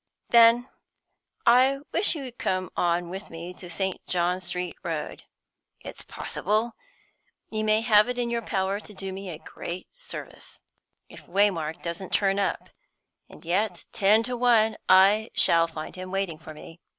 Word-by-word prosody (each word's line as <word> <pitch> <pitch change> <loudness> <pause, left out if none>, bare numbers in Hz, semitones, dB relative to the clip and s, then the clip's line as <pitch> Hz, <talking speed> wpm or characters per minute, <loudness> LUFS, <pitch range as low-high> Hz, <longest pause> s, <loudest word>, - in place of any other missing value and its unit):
"Then 235 +1 +6 0.8
I 255 +3 +5
wish 390 - +2
you'd 270 -5 -6
just 240 - -38
come 185 -1 -1
on 175 0 0
with 190 +3 -7
me 170 +2 -8
to 180 -1 -11
St. 190 +2 -2
John's 180 +1 0
Street 180 0 -3
Road. 165 -4 -5 0.5
It's - - -7
possible 215 +4 -2 0.8
you 215 -1 -1
may 215 0 +3
have 215 0 +5
it 250 - -3
in 240 -1 -1
your 235 0 -1
power 195 -2 -1
to 210 -1 -13
do 190 0 -5
me 195 0 -7
a 160 - -6
great 175 +3 -8
service, - - -10 0.5
if - - -14
Waymark 175 -4 0
doesn't 170 +2 -5
turn 195 -1 +2
up. 200 - -2 0.6
And - - -15
yet, 180 +1 -1
ten 210 +3 +4
to 250 +1 -2
one, 230 -3 +3
I 200 +4 +6
shall 165 0 +5
find 160 -1 -7
him 185 0 -7
waiting 190 -4 -2
for 155 -1 -11
me. 165 +2 -12
195 Hz, 160 wpm, -26 LUFS, 175-220 Hz, 0.8 s, Then